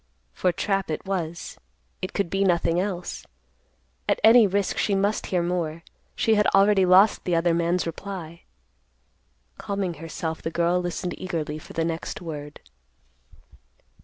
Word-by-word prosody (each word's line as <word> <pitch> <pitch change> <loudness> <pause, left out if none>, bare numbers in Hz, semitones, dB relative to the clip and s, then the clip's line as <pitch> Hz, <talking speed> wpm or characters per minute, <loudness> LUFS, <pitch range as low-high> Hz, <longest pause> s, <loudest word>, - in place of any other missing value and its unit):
For 180 - +1
trap 195 +2 -1
it 155 - -4
was. 170 -4 -4 0.4
It 185 - -4
could 200 -5 -1
be 195 0 +1
nothing 175 -2 +2
else. 180 -2 -3 0.9
At - - +2
any 225 0 +8
risk 200 0 -1
she 200 - +1
must 200 +2 0
hear 180 -2 0
more. 170 -2 -2 0.3
She 225 - +2
had 210 -1 +3
already 195 -1 +5
lost 190 +4 +5
the 175 - 0
other 165 0 +2
man's 170 +2 +1
reply. 170 -1 -7 1.2
Calming 195 -3 -2
herself, 160 0 -4
the - - -3
girl 170 +2 +1
listened 175 0 -3
eagerly 160 -4 -3
for - - -13
the 165 - 0
next 165 0 -4
word. 150 -3 -8
180 Hz, 145 wpm, -25 LUFS, 165-195 Hz, 1.2 s, any